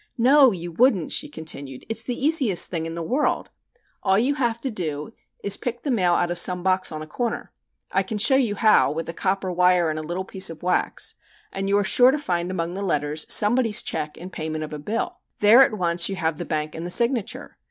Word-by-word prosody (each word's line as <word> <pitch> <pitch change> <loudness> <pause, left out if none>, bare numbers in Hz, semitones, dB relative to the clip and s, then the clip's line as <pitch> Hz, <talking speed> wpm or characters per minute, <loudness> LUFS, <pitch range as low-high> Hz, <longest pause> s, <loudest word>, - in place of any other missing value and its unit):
"No, 265 +2 +5
you 175 -3 -6
wouldn't," 195 - +2
she 295 - -1
continued. 140 - -5
"It's 225 +1 -4
the 245 +1 -4
easiest 270 - +2
thing 165 -2 -3
in 165 - -7
the 170 - -4
world. 265 - -1 0.5
All 190 0 +2
you 250 +7 +1
have 240 -5 -1
to 265 - -3
do 160 -1 -5 0.3
is 200 - +2
to - - 0
pick 240 -1 -5
the 285 - -2
mail 180 -7 +2
out 175 0 0
of 175 - -3
some 180 0 +2
box 185 -1 +1
on 155 0 -6
a - - -8
corner. 235 +9 -4 0.4
I 195 - +2
can 205 +3 -5
show 235 +6 +5
you 240 -6 +1
how 215 -9 +3
with 165 +2 -5
a - - -4
copper 190 +1 -2
wire 180 -2 +2
and 155 - -4
a - - -4
little 175 +4 -5
piece 190 -2 -1
of 165 0 -11
wax 180 0 -1 0.4
and 195 0 -3
you 200 - +3
are 205 - +1
sure 245 +6 +5
to 275 - +1
find 175 -10 -2
among 170 -2 -3
the 195 - -5
letters 150 -4 -2
somebody's 225 +1 +4
check 155 -1 -4
in 180 +3 -10
payment 155 -1 -5
of 155 - -8
a 150 - -6
bill. 215 +10 -4 0.2
There 215 +5 +6
at 225 -5 +3
once 170 -1 +3
you 195 - -3
have 165 -4 -2
the - - -4
bank, 155 0 -3
and 165 - -7
the 175 - -5
signature. 235 +2 0
185 Hz, 235 wpm, -23 LUFS, 165-230 Hz, 0.5 s, There